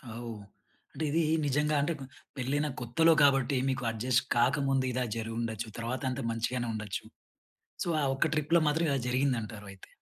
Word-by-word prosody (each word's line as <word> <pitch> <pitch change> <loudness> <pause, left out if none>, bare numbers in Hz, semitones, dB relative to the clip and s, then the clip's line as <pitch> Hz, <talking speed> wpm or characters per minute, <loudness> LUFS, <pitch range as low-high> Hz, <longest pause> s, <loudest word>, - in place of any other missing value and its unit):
ఓహ్! 115 -3 -6 0.5
అంటే - - -5
ఇది 165 +3 +2 0.2
నిజంగా 150 +2 +1
అంటే 145 +4 0
కొ - - -7 0.3
పెళ్ళైన 140 +4 0
కొత్తలో 160 +8 +4
కాబట్టి 135 -1 +4
మీకు 135 0 -1
అడ్జస్ట్ 120 +3 +1
కాకముందు 135 +2 +2
ఇలా 125 +1 0
జరిగి 115 0 -4
ఉండొచ్చు. 115 -1 -3
తర్వాత 120 +2 -3
అంతా 130 +1 -3
మంచిగానే 120 +2 -2
ఉండొచ్చు. 105 -3 -4 0.8
సో, - - -4
ఆ! - - +2
ఒక్క 135 - +1
ట్రిప్‌‌‌లో 155 +2 +3
మాత్రం 160 +3 +1
ఇలా 140 - +1
జరిగింది 130 +1 +2
అంటారు 105 -1 -8
అయితే. 95 - -15
130 Hz, 170 wpm, -30 LUFS, 115-140 Hz, 0.8 s, కొత్తలో